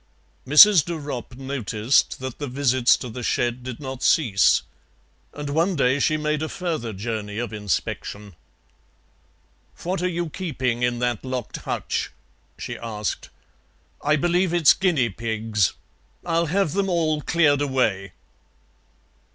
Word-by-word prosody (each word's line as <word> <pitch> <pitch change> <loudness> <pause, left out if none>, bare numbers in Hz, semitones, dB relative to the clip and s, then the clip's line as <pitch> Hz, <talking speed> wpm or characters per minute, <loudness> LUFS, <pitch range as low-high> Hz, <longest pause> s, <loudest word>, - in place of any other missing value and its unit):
Mrs. 165 +4 +8
de 175 - -4
Ropp 135 -5 -6
noticed 130 -3 0
that 130 -2 -6
the 145 - -3
visits 130 -2 +3
to 125 - -7
the 125 +2 -7
shed 120 +1 -1
did 125 -1 -7
not 130 -3 -7
cease, 110 -11 +3 0.7
and 145 0 -7
one 170 +5 +1
day 135 -1 +2
she 155 +2 +2
made 150 0 -1
a 155 - -2
further 160 -11 -3
journey 105 0 -5
of 120 -1 -4
inspection. 105 0 -4 1.5
"What 180 +1 -2
are 180 - 0
you 170 -1 -3
keeping 130 -10 -2
in 120 0 +1
that 120 -3 -2
locked 130 -4 -4
hutch?" - - -3 0.5
she - - -6
asked. 105 -3 -4 0.7
"I 150 +1 +2
believe 175 +3 +1
it's 165 -5 +6
guinea 160 -11 +1
pigs. 110 -2 -1 0.5
I'll 170 -1 +1
have 180 -1 0
them 195 0 0
all 160 -4 +1
cleared 150 -3 +2
away." 110 -9 0
130 Hz, 135 wpm, -23 LUFS, 115-160 Hz, 1.5 s, Mrs